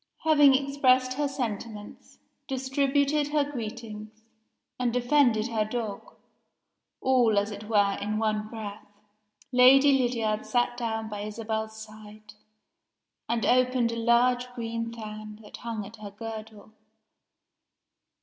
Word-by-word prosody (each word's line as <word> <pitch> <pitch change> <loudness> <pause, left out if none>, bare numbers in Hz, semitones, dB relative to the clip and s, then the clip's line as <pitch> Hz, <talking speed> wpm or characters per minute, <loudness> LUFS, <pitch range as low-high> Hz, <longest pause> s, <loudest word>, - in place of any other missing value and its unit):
Having 295 -4 +6
expressed 260 -2 +2
her 290 +2 -1
sentiments, 225 -5 -6 0.3
distributed 280 +2 +1
her 295 0 +1
greetings, 220 -4 -7 0.6
and 245 -1 +1
defended 245 -2 +2
her 220 -2 0
dog 215 -2 -5 0.9
all, 245 -5 +3
as 205 +1 +1
it 205 +1 -8
were, 200 -2 +2
in 210 +1 -2
one 215 -1 -1
breath 215 -2 -8 0.6
Lady 265 +3 +7
Lydiard 230 -4 0
sat 245 -1 0
down 225 -2 -3
by 210 -1 -6
Isabel's 220 +1 -4
side, 215 -1 -12 1.0
and 230 -1 0
opened 250 -1 +3
a - - -4
large 245 +2 +2
green 230 -1 -4
fan 215 -2 -8
that - - -11
hung 225 -3 -5
at 210 +3 -12
her 210 -1 -8
girdle. 220 0 -9
230 Hz, 120 wpm, -27 LUFS, 215-255 Hz, 1.0 s, Lady